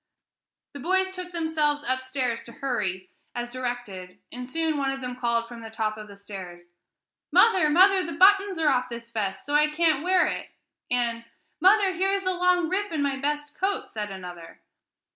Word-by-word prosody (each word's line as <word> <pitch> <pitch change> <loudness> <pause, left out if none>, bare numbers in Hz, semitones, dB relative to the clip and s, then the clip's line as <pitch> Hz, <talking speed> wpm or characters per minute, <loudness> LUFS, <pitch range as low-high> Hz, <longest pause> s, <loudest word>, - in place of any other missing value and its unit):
The 285 - -8
boys 375 +5 +1
took 365 -1 -7
themselves 315 -3 0
upstairs 260 -2 -1
to 235 - -11
"hurry," 190 -9 -3 0.2
as 240 0 -4
directed, 240 -8 -5
and 250 +1 -7
soon 320 +2 0
one 275 -1 0
of 270 0 -3
them 250 -1 -5
called 235 -2 0
from 235 -1 -10
the 225 - -8
top 220 -1 -2
of 215 0 -9
the 200 -1 -13
stairs, 180 -4 -10 0.6
"Mother! 375 -9 +5
mother! 375 +4 +5
the 335 - -5
buttons 395 0 +5
are 320 -2 +3
off 255 -2 +1
this 235 -1 -8
vest; 195 -4 -3
so 290 - -4
I 300 +1 +5
can't 310 -2 +2
wear 365 0 +3
it!" - - -4 0.4
and 235 -2 0 0.4
"Mother! 390 0 +5
here 380 +3 +1
is 395 -1 -1
a 370 - +3
long 360 -1 +2
rip 395 +3 -1
in 305 -3 -1
my 275 -1 0
best 295 +2 -3
coat!" 390 +1 -1
said 210 -1 -4
another. 180 -3 -10
270 Hz, 185 wpm, -26 LUFS, 230-355 Hz, 0.6 s, Mother